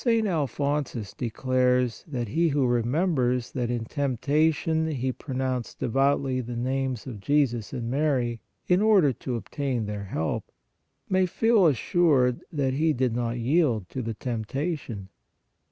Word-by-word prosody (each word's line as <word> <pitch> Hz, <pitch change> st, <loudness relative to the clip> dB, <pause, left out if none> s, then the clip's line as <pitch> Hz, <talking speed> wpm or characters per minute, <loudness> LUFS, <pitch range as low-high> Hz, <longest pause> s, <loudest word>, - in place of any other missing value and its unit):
St. 230 Hz, -3 st, +3 dB
Alphonsus 145 Hz, -, -1 dB
declares 125 Hz, 0 st, 0 dB
that 120 Hz, -7 st, -3 dB
he 165 Hz, +8 st, +2 dB
who 140 Hz, -3 st, +2 dB
remembers 125 Hz, 0 st, +1 dB
that 120 Hz, -2 st, -2 dB
in 120 Hz, -2 st, -2 dB
temptation 155 Hz, +5 st, +1 dB
he 130 Hz, -4 st, -1 dB
pro 130 Hz, +1 st, -7 dB
nounced 130 Hz, -2 st, -2 dB
devoutly 135 Hz, +1 st, +1 dB
the 120 Hz, 0 st, -6 dB
names 130 Hz, 0 st, -2 dB
of 120 Hz, -6 st, -7 dB
Jesus 120 Hz, -3 st, +1 dB
and 120 Hz, -3 st, -4 dB
Mary, 125 Hz, -4 st, 0 dB, 0.3 s
in 180 Hz, +2 st, +4 dB
order 195 Hz, -11 st, +5 dB
to 125 Hz, +1 st, -4 dB
obtain 120 Hz, +2 st, -2 dB
their 105 Hz, -1 st, -4 dB
help, 80 Hz, -4 st, -3 dB, 0.6 s
may 185 Hz, -1 st, +2 dB
feel 220 Hz, 0 st, +4 dB
assured 140 Hz, -3 st, +2 dB
that 140 Hz, -4 st, 0 dB
he 155 Hz, +3 st, +2 dB
did 125 Hz, -3 st, 0 dB
not 120 Hz, 0 st, -1 dB
yield 120 Hz, -, +1 dB
to 130 Hz, -, -4 dB
the 115 Hz, -2 st, -4 dB
temptation. 120 Hz, -, -4 dB
130 Hz, 140 wpm, -26 LUFS, 120-150 Hz, 0.6 s, order